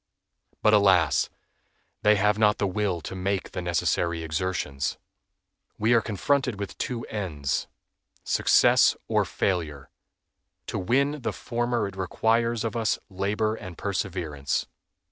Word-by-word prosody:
But, 105 - +5
alas! 95 -6 +4 0.7
they 105 0 +5
have 105 +1 +2
not 105 -1 +4
the 100 - 0
will 95 -3 -1
to - - -7
make 95 +1 -2
the - - -4
necessary 85 -1 0
exertions. 80 -4 -2 0.8
We 110 +3 +3
are 115 - +5
confronted 125 +2 0
with 100 -2 -5
two 120 -2 -3
ends—success 75 -11 +1
or - - +2
failure. 75 -8 -2 0.7
To - - -3
win 140 +8 +1
the - - -1
former 120 -2 -1
it 100 - -9
requires 115 +5 +1
of 115 0 -3
us 115 -2 +1
labor 100 +3 0
and 90 -6 -8
perseverance. 90 -8 -2
100 Hz, 125 wpm, -26 LUFS, 90-110 Hz, 0.8 s, But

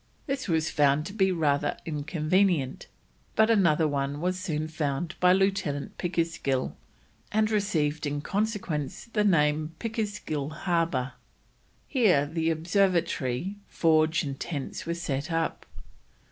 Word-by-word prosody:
This 275 -4 -3
was 160 -3 +1
found 145 0 +3
to 195 - -6
be 190 -3 +2
rather 145 -4 +1
inconvenient, 155 0 0 0.5
but 220 +1 +5
another 170 -7 +4
one 140 0 -2
was 180 +2 -1
soon 155 -4 -2
found 155 +1 -2
by 180 0 +5
Lieutenant 190 -7 0
Pickersgill, 165 -7 -1 0.6
and 215 +1 +2
received 160 -8 0
in 145 0 -2
consequence 195 -7 -2
the 210 - +2
name 155 -4 +2
Pickersgill 205 -10 -3 0.2
Harbour. 165 -7 0 0.7
Here 200 - +3
the 160 +2 -1
observatory, 170 -2 0
forge, 160 -1 +3
and 135 -2 -5
tents 145 -2 -5
were 170 - -1
set 145 -2 -3
up. 165 0 -1
165 Hz, 120 wpm, -27 LUFS, 150-190 Hz, 0.7 s, but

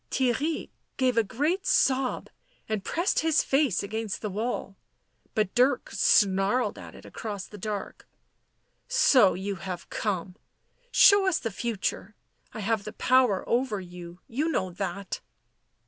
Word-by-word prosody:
Theirry 270 +5 -1 0.3
gave 255 -2 +2
a 230 - +4
great 310 - -1
sob, 260 -1 +1 0.4
and 215 -3 -2
pressed 345 +4 0
his 320 -1 +2
face 270 - +1
against 220 0 -4
the 210 - -2
wall. 210 -1 -3 0.6
But 210 -4 0
Dirk 250 +1 +2
snarled 200 +2 +2
at - - -11
it - - -14
across 205 -4 -6
the 210 - -12
dark. 205 0 -5 0.5
" - - -46 0.2
So 220 -9 +6
you 195 +1 -4
have 180 0 -7
come. 190 -3 -3 0.5
Show 405 -5 +6
us 375 - +2
the 225 - -4
future. 210 -1 -3 0.4
I 220 - -7
have 215 0 0
the 215 - -7
power 250 -5 +2
over 235 -4 0
you. 175 -1 -10
You 290 +8 -1
know 185 - -1
that." 190 +1 -4
220 Hz, 145 wpm, -27 LUFS, 195-260 Hz, 0.6 s, So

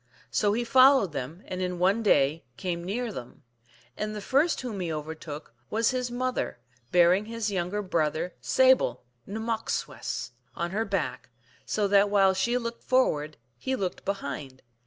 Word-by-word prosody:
So 205 -1 +2
he 240 +3 0
followed 255 - +6
them, 150 +7 -6
and 185 0 -5
in 180 -1 -2
one 190 +6 +3
day 150 -6 +3
came 175 -3 -3
near 225 +6 -2
them. 125 - -9 0.5
And 215 0 -3
the - - -4
first 280 - +2
whom 235 -6 -5
he 175 -3 -2
overtook 155 -2 -6 0.2
was 225 +1 +2
his 250 -1 -1
mother, 250 - -2 0.3
bearing 180 +3 +5
his 225 -1 -3
younger 190 +2 -1
brother 165 -1 0
Sable 260 - +3
( 120 - -41
Nmmok 225 +2 -3
swess, - - -3
P.) 125 +1 -40
on 170 0 -1
her 220 +3 0
back, 150 - -2 0.4
so 205 +9 +1
that 200 +1 +4
while 195 -2 +4
she 235 +6 +1
looked 235 -1 -4
forward 155 - +1 0.2
he 265 - -1
looked 190 -6 -3
behind. 140 -9 -5
195 Hz, 165 wpm, -28 LUFS, 160-230 Hz, 0.5 s, followed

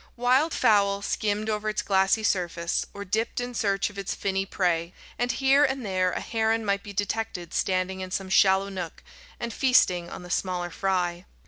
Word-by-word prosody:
Wild 255 +6 +3
fowl 200 -5 +3
skimmed 210 +1 -1
over 215 0 -1
its 215 - -2
glassy 195 +2 +2
surface, 175 -4 -1
or 200 0 -7
dipped 220 +6 -1
in 245 0 -4
search 200 -3 0
of 200 - -9
its 195 - -3
finny 195 0 -1
prey, 175 -3 -1 0.2
and 245 0 +1
here 275 +1 +4
and 265 -3 0
there 185 -2 +1
a - - -3
heron 225 0 0
might 200 -1 +1
be 205 - -9
detected 200 -3 -3
standing 190 0 0
in 185 - -5
some 190 +1 -3
shallow 190 +1 +4
nook, 180 -4 -6 0.4
and 235 -1 -4
feasting 185 -10 +3
on - - -8
the 175 - -9
smaller 180 -2 -1
fry. 180 -1 -1
200 Hz, 185 wpm, -26 LUFS, 185-220 Hz, 0.4 s, here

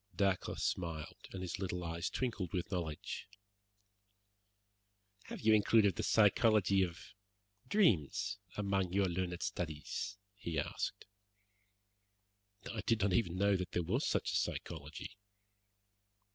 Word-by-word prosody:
Dacre 95 -2 +1
smiled, 80 -4 -3
and 95 -1 -5
his 90 - -4
little 90 -2 -2
eyes 85 0 -2
twinkled 115 -9 -2
with 90 +2 -2
knowledge. 85 0 -3 2.0
"Have - - -7
you 110 0 +5
included 105 -2 +5
the - - -2
psychology 105 -2 +4
of 85 -2 -3 0.5
dreams 115 - +2 0.2
among 100 -3 0
your 100 +1 +3
learned 90 -1 -2
studies?" 80 -4 -3 0.2
he 85 -5 -4
asked. 75 - -2 1.7
"I 110 - -3
did 115 -2 +3
not 95 -1 +2
even 90 -4 +2
know 100 +1 +4
that 90 -1 -3
there 90 - +1
was - - 0
such - - +1
a - - -1
psychology." 80 +7 -4
95 Hz, 120 wpm, -35 LUFS, 85-105 Hz, 2.0 s, you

